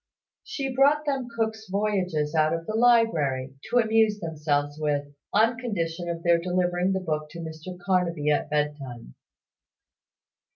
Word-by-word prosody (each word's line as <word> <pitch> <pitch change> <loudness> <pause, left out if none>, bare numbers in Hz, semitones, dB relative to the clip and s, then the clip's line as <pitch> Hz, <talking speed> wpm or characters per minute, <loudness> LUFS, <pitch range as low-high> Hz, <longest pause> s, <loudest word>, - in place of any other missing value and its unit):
She 275 -11 -4
brought 290 +3 +4
them 270 -4 -1
Cook's 220 -2 -3
Voyages 185 -7 0
out 155 0 +3
of 165 0 -6
the 215 - -4
library, 170 - +3 0.2
to 245 - +2
amuse 220 -2 +3
themselves 150 -3 -1
with, 145 -1 -1 0.2
on 230 +3 +3
condition 175 -7 -3
of 170 0 -4
their 170 -1 +4
delivering 180 +1 0
the 190 - 0
book 155 -3 -3
to 170 - -9
Mr 160 +2 -7
Carnaby 175 -4 +1
at 145 - 0
bedtime. 145 - -3
175 Hz, 140 wpm, -26 LUFS, 150-220 Hz, 0.2 s, brought